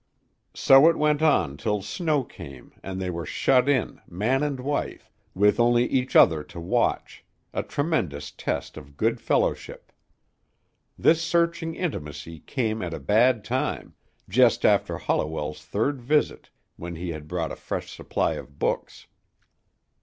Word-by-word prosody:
So 135 +4 +7
it 165 - 0
went 150 0 +2
on 145 - +2
till 105 +6 -2
snow 150 - -1
came 70 - -12
and 95 -1 -6
they 90 -1 -2
were 85 -1 -4
shut 125 - +2
in, 130 -8 0
man 110 +10 0
and 145 -3 -2
wife, 140 +3 -4 0.2
with 105 +4 +3
only 120 0 +4
each 130 0 -1
other 80 -3 +6
to 85 - -11
watch, 85 - -1 0.3
a - - -1
tremendous 95 - -2
test - - -4
of 70 -2 -12
good - - 0
fellowship. - - -1 1.1
This 165 0 +3
searching 170 0 0
intimacy 80 - -5
came 110 - -2
at 85 -2 -4
a - - -7
bad 110 - +3
time, 125 +4 -2 0.3
just - - +3
after - - +2
Holliwell's 75 -1 -2
third 120 - -2
visit 150 +5 0 0.3
when 85 0 -7
he 85 +2 -5
had 75 -2 -8
brought 85 -1 -3
a - - -5
fresh - - -5
supply - - -1
of 70 +2 -10
books. - - -3
110 Hz, 145 wpm, -25 LUFS, -, 1.1 s, So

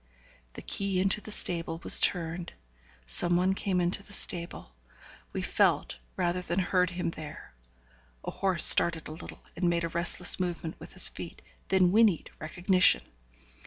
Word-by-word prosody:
The - - -11
key 195 -2 -2
into 195 +3 0
the 210 - -10
stable 165 -5 +1
was - - +4
turned 170 -1 0 0.5
some 60 - 0
one 185 +2 0
came 190 -2 -3
into 175 +3 -1
the 205 0 -9
stable 170 - -3 0.6
we - - -6
felt - - -1 0.2
rather 175 +1 -2
than 175 0 -5
heard 180 -1 0
him 175 -1 -5
there. 155 - -12 0.7
A - - -6
horse 185 -4 +2
started 165 -2 +6
a - - -10
little, 160 - -11
and 175 - -1
made 170 0 -2
a 165 - -4
restless 170 +2 +2
movement 170 -2 -6
with - - -13
his - - +6
feet, - - -11 0.2
then 185 -2 +1
whinnied 210 -5 +1
recognition. 180 +4 +1
175 Hz, 160 wpm, -27 LUFS, 170-185 Hz, 0.7 s, started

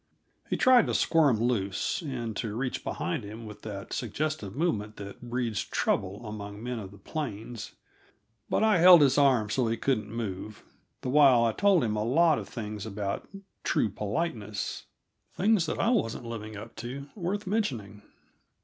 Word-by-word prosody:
He - - 0
tried 255 -2 +6
to - - 0
squirm 145 -9 +3
loose, 105 - 0
and 120 -8 -4
to 110 -2 -3
reach 125 +2 -2
behind 85 - -2
him 110 +3 -8
with 105 -1 -10
that 100 -2 -7
suggestive 120 -3 -3
movement 110 -10 -1
that 100 -1 -9
breeds 120 -3 -2
trouble 100 +5 -1
among 105 0 -7
men 125 -1 -3
of 100 -3 -7
the 100 - -14
plains; 115 - -5 0.8
but - - +2
I 215 -5 +4
held 175 -1 +9
his 135 0 +4
arms 125 -7 +3
so 125 -3 +1
he 115 +1 0
couldn't 110 -6 0
move, 110 -2 -5 0.4
the - - -3
while 135 -5 +6
I 115 - +3
told 195 - +3
him 110 -2 0
a 105 - 0
lot 155 +7 +4
of - - -8
things 105 -3 -5
about 100 -1 -3 0.4
true 110 - +1
politeness 105 - -3 0.5
things 200 -4 +3
that - - -2
I 230 - +2
wasn't 120 - 0
living 110 -2 -6
up 110 +3 -9
to 130 +4 -6
worth 200 +2 -2
mentioning. 120 - -2
115 Hz, 165 wpm, -28 LUFS, 105-150 Hz, 0.8 s, held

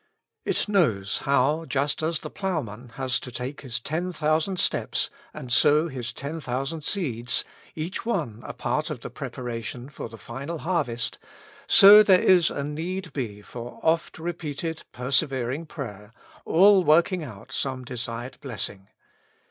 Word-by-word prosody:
It - - 0
knows 115 - +2
how, 140 +4 +3
just 145 0 0
as 160 +1 0
the - - -7
ploughman 130 - -3
has 130 -2 0
to 125 - -8
take 130 +4 -5
his 125 -5 -3
ten 165 +9 -2
thousand 160 +3 0
steps - - 0 0.2
and 125 -1 -5
sow 150 +4 +5
his 125 -4 -5
ten 145 +7 -5
thousand 135 +4 -3
seeds, 125 - +1 0.3
each 165 +4 -4
one 165 - -2
a - - -5
part - - -2
of - - -5
the - - -7
preparation 120 +1 -5
for 140 - -7
the 115 - -11
final 135 - -6
harvest, 145 -10 -1 0.5
so 205 +2 +10
there 190 -3 +6
is 180 -3 +5
a 140 - -3
need 165 +3 -4
be 105 -7 -4
for 120 +2 -8
oft 165 +1 +1
repeated 160 -1 -4
persevering 135 +2 0
prayer, 105 -9 -7 0.3
all 195 +2 +6
work 165 +4 +5
ing 180 -3 -2
out 120 -2 -10
some 130 -1 -2
desired 120 +1 -5
blessing. 105 -7 -5
140 Hz, 150 wpm, -26 LUFS, 120-165 Hz, 0.5 s, so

